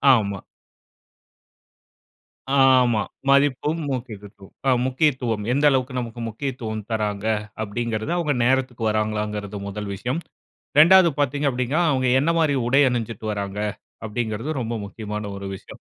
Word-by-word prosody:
ஆமா. 100 Hz, -3 st, -1 dB, 2.2 s
ஆமா. 130 Hz, -5 st, +5 dB, 0.3 s
மதிப்பும் 145 Hz, +3 st, +3 dB
முக்கியத்துவம் 105 Hz, -6 st, -7 dB
அ -, -, +5 dB
முக்கியத்துவம் 130 Hz, -5 st, 0 dB
எந்த 145 Hz, +2 st, +2 dB
அளவுக்கு 130 Hz, -1 st, 0 dB
நமக்கு 120 Hz, 0 st, -6 dB
முக்கியத்துவம் 110 Hz, -4 st, -5 dB
தராங்க? 105 Hz, -1 st, -2 dB, 0.4 s
அப்டீங்குறது 110 Hz, +5 st, -3 dB
அவங்க 150 Hz, -4 st, +1 dB
நேரத்துக்கு 125 Hz, -3 st, +1 dB
வர்றாகளாங்குறது 105 Hz, -1 st, -2 dB
முதல் 100 Hz, 0 st, -5 dB
விஷயம். 125 Hz, -, -3 dB, 0.6 s
2வது 175 Hz, +2 st, +8 dB
பாத்தீங்க 145 Hz, +1 st, 0 dB
அப்டீன்னா, 125 Hz, +7 st, 0 dB
அவங்க 130 Hz, -1 st, +1 dB
என்ன 165 Hz, +3 st, +2 dB
மாரி 150 Hz, -3 st, +2 dB
உடை 135 Hz, +3 st, +4 dB
அணிஞ்சிட்டு 115 Hz, -3 st, -3 dB
வராங்க? 100 Hz, 0 st, -4 dB, 0.5 s
அப்படிங்குறது 110 Hz, +4 st, -3 dB
ரொம்ப 115 Hz, 0 st, -3 dB
முக்கியமான 105 Hz, 0 st, -6 dB
ஒரு 100 Hz, -, -7 dB
விஷயம். -, -, -12 dB
120 Hz, 115 wpm, -23 LUFS, 105-135 Hz, 2.2 s, 2வது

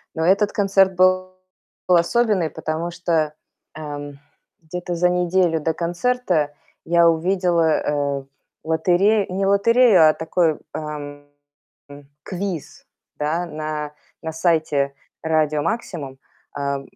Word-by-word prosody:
Но 160 Hz, 0 st, -1 dB
этот 200 Hz, +3 st, +3 dB
концерт 195 Hz, -2 st, +2 dB
был 185 Hz, 0 st, +2 dB, 0.5 s
особенный, 185 Hz, 0 st, +2 dB
потому 160 Hz, +3 st, -4 dB
что, 165 Hz, -3 st, -1 dB, 0.4 s
эм, 145 Hz, -2 st, -7 dB, 0.4 s
где-то 175 Hz, +2 st, -5 dB
за 180 Hz, +1 st, +2 dB
неделю 180 Hz, -1 st, +1 dB
до 160 Hz, +2 st, 0 dB
концерта 175 Hz, -3 st, -1 dB, 0.3 s
я 170 Hz, 0 st, +4 dB
увидела, 170 Hz, -1 st, +1 dB
э, 140 Hz, -1 st, -1 dB, 0.4 s
лотерею, 180 Hz, +6 st, +2 dB
не 195 Hz, +1 st, -1 dB
лотерею, 200 Hz, -3 st, +5 dB
а -, -, +3 dB
такой, 160 Hz, 0 st, 0 dB, 0.2 s
эм, 145 Hz, -1 st, -7 dB, 1.0 s
квиз, 185 Hz, -5 st, -6 dB, 0.3 s
да, 160 Hz, +4 st, -1 dB
на 155 Hz, -2 st, -5 dB, 0.3 s
на 160 Hz, -, -4 dB
сайте 155 Hz, -4 st, +1 dB, 0.3 s
"Радио 155 Hz, -2 st, +1 dB
Максимум". 155 Hz, -, -4 dB, 0.4 s
Э, 140 Hz, -1 st, -3 dB
170 Hz, 105 wpm, -21 LUFS, 155-185 Hz, 1.0 s, лотерею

